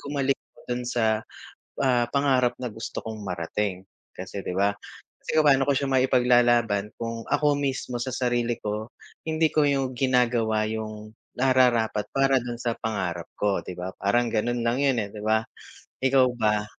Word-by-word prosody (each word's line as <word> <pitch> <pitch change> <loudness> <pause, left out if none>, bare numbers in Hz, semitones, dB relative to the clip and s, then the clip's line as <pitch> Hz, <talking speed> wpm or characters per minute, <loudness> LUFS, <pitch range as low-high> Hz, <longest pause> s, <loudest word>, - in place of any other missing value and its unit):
gumaling 140 -1 0
ako - - -25
dun 125 0 -1
sa, 120 -2 0 0.8
ah, 125 -3 +3
pangarap 130 -3 +2
na 125 - -3
gusto 110 +1 -6
kong 110 -1 -6
marating, 90 +2 -2 0.3
kasi 95 +2 -6
'di 90 - -3
ba? 100 +1 +3 0.5
Kasi - - -3
kung 155 - +5
paano 135 -1 +5
ko 140 - +4
siya 140 0 0
maipaglalaban, 120 -5 +3
kung 115 0 -5
ako 145 0 +2
mismo 130 -3 -2
sa 130 0 -3
sarili 120 -2 0
ko 105 +1 -3 0.4
hindi 160 0 +2
ko 150 -2 +3
yu 135 -2 +1
ginagawa 120 -4 +2
yung 110 -1 -6 0.3
nararapat 125 -5 +3
para 135 -1 +4
dun 120 0 -5
sa 120 -2 -1
pangarap 95 -6 -3
ko 100 -2 +1
'di 90 - -7
ba, 90 +1 -4
parang 120 +4 +2
ganu'n 120 +2 0
lang 120 +2 +1
'yun, 135 -3 +3
eh, 100 - -5
'di 105 - -7
ba? 110 +1 +2 0.6
Ikaw 135 0 +5
ba? 105 -2 +1
120 Hz, 170 wpm, -25 LUFS, 110-130 Hz, 0.8 s, kung